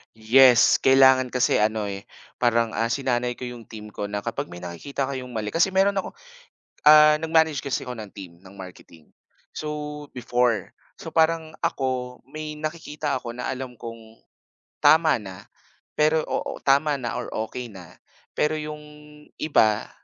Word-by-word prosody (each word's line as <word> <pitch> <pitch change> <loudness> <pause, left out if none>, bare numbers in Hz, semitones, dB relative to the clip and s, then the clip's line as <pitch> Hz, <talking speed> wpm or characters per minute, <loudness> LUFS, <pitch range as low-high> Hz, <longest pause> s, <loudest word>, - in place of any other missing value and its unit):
Yes, 120 +2 +6
kailangan 130 -1 +5
kasi 125 -1 +2
ano 105 -1 0
eh, 100 +2 -7 0.3
parang, 115 -1 +2
ah, 115 - -1
sinanay 120 0 -1
ko 125 0 -7
'yong 120 -2 -10
team 105 -1 -10
ko 105 - -5
na 100 0 -4
kapag - - -4
may 85 0 -11
nakikita 130 +11 -4
kayong 130 -2 -6
mali 110 -2 -3
kasi 175 - +1
meron 195 +1 +3
ako 195 - -3 0.7
ah, 150 0 +8
nag-manage 160 -2 +2
kasi 140 -2 -3
ako 125 -2 -7
ng 105 -2 -9
team 95 -3 -9
ng 95 +1 -16
marketing. 90 -4 -13 0.4
So, 150 -1 -6
before 120 -4 0 0.3
so - - -9
parang 160 0 +1
ako 125 -2 -2
may 155 +2 -7
nakikita 155 -1 -4
ako 120 - -7
na 125 +1 -3
alam 130 -1 -6
kong 115 -1 -11 0.6
tama 155 -7 +5
na, 95 -2 -10 0.5
pero, 155 +1 +3
oo, - - -4
tama 140 +2 +3
na 120 -3 -4
or 125 - -5 0.2
okey 120 -3 -7
na, 90 -4 -13 0.4
pero 150 +1 +2
'yong 150 -1 -5 0.6
iba, 110 -9 +2
125 Hz, 155 wpm, -24 LUFS, 110-150 Hz, 0.7 s, ah